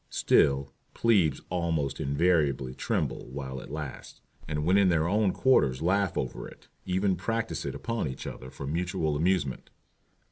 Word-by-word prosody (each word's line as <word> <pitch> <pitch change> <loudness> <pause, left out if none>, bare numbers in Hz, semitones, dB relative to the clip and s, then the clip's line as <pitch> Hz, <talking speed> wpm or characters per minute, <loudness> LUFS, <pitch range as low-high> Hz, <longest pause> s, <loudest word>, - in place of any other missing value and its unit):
Still 70 0 +2 0.2
"plebes" 95 - +3
almost 85 -5 -1
invariably 70 -3 +1
tremble - - -2
while 65 0 -5
it - - -10
lasts, 75 -1 -7 0.3
and 75 -1 -2
when 90 +3 +4
in 100 -2 +5
their 85 -2 +2
own 100 +1 +2
quarters 70 - +3
laugh 100 +3 +1
over 65 - -3
it, - - -16 0.2
and 90 - -1
even 95 0 +2
practise 115 +5 -2
it - - -4
upon 115 -7 -2
each 65 - -6
other 65 - -7
for 70 - -8
mutual 80 0 -1
amusement. 80 -3 0
80 Hz, 155 wpm, -28 LUFS, 70-95 Hz, 0.3 s, in